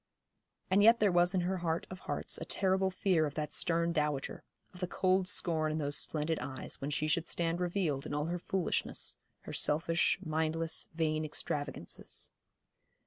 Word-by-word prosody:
And 195 +2 +5
yet 230 +3 +7
there 205 -2 +4
was 175 +1 +3
in 185 - +2
her 185 +2 -1
heart 170 -2 -1
of 185 - -7
hearts - - -2
a - - -4
terrible 190 0 +2
fear 180 -4 +2
of 145 - -8
that 150 -1 -3
stern 170 0 +1
dowager, 150 -3 -1 0.3
of 180 - -12
the 180 - -1
cold 185 +1 +2
scorn 160 -5 +2
in 155 - -1
those 145 -1 0
splendid 155 +1 0
eyes 130 -1 -4
when 140 - -2
she 150 +1 0
should 160 +2 +1
stand 170 0 0
revealed 170 -6 -1
in - - -5
all 150 0 0
her 175 +2 -2
foolishness, 185 +1 0 0.2
her - - -8
selfish, 165 +3 +2
mindless, 160 +1 0
vain 155 -1 0
extravagances. 145 - -4
165 Hz, 175 wpm, -33 LUFS, 155-180 Hz, 0.3 s, yet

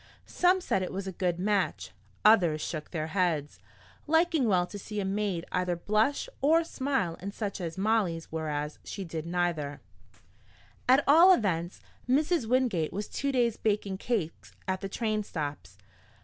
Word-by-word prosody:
Some 365 +1 +2
said 195 - 0
it 185 - -3
was 195 +1 -4
a 190 - -4
good 175 -1 -1
match, 185 - -1 0.3
others 180 -8 +5
shook 155 0 -5
their 155 -3 -3
heads, 165 -6 0 0.5
liking 320 -4 +3
well 180 -4 +3
to 205 +3 -8
see 210 +2 -5
a 195 - -1
maid 195 -3 -1
either 180 -1 0
blush 215 - +1
or 320 +4 +4
smile 265 - -2
in 200 +2 -4
such 205 -1 -4
case 170 -3 -4
as - - -15
Molly's, 195 -5 0
whereas 150 -2 -3
she 195 - -6
did 160 -1 -5
neither. 170 -5 -1 1.1
At 265 +3 +6
all 330 +6 +8
events, 180 - 0 0.3
Mrs. 300 0 +2
Wingate 235 -10 +1
was 205 +1 -4
two 280 0 -2
days 240 -4 +1
baking 205 -3 -1
cakes 200 -10 -3
at 190 0 -1
the 195 - -4
train 215 0 -1
stops. 150 -7 -6
195 Hz, 165 wpm, -29 LUFS, 170-235 Hz, 1.1 s, all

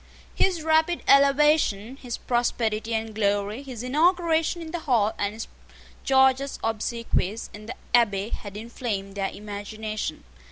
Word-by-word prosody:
His 360 -4 +1
rapid 320 +2 +2
elevation, 275 -5 +4
his 245 -4 -5
prosperity 230 -2 -1
and 220 0 -3
glory, 205 +2 0
his 255 -4 -7
inauguration 330 +4 +2
in 325 -1 -7
the 345 - -3
Hall, 235 -8 +2
and 205 +1 -1
his 225 - -6 0.6
gorgeous 265 +1 +3
obsequies 225 -2 -2
in 210 +1 -10
the 250 - -5 0.2
Abbey, 210 -4 +3
had 205 -3 -6
inflamed 215 -3 -4
their 195 -1 -2
imagination. 210 +1 -5
230 Hz, 130 wpm, -25 LUFS, 210-275 Hz, 0.6 s, elevation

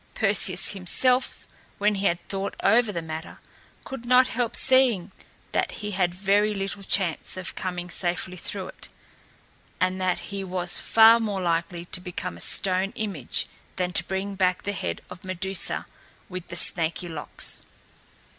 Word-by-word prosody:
Perseus 195 -3 +3
himself, 250 +7 +1 0.3
when 210 +1 +2
he 200 0 +1
had 170 0 -2
thought 195 0 -3
over 225 +1 +4
the 170 -4 -4
matter, 160 0 -7 0.5
could 270 -3 -7
not 255 +1 +5
help 240 -1 -1
seeing 240 -8 +3 0.4
that - - 0
he 210 -1 -5
had 180 -2 0
very 205 +2 +2
little 195 0 -3
chance 190 -3 -1
of 185 -1 -4
coming 180 -1 -4
safely 180 +1 -2
through 185 +1 -4
it, - - -12 0.9
and 185 +1 0
that 185 -1 +1
he 195 -1 -3
was 180 -1 -2
far 225 +1 +7
more 210 -4 -2
likely 170 0 -1
to 180 - -5
become 180 - -5
a 85 - -9
stone 190 - +4
image 195 - -2 0.3
than 180 -1 -2
to - - +3
bring 195 +1 -3
back 185 -2 +1
the 205 - -2
head - - -3
of 180 - -10
Medusa 185 +1 0 0.4
with 185 -1 -7
the 170 - -7
snaky 170 +1 +1
locks. 160 -3 -3
190 Hz, 155 wpm, -25 LUFS, 180-205 Hz, 0.9 s, far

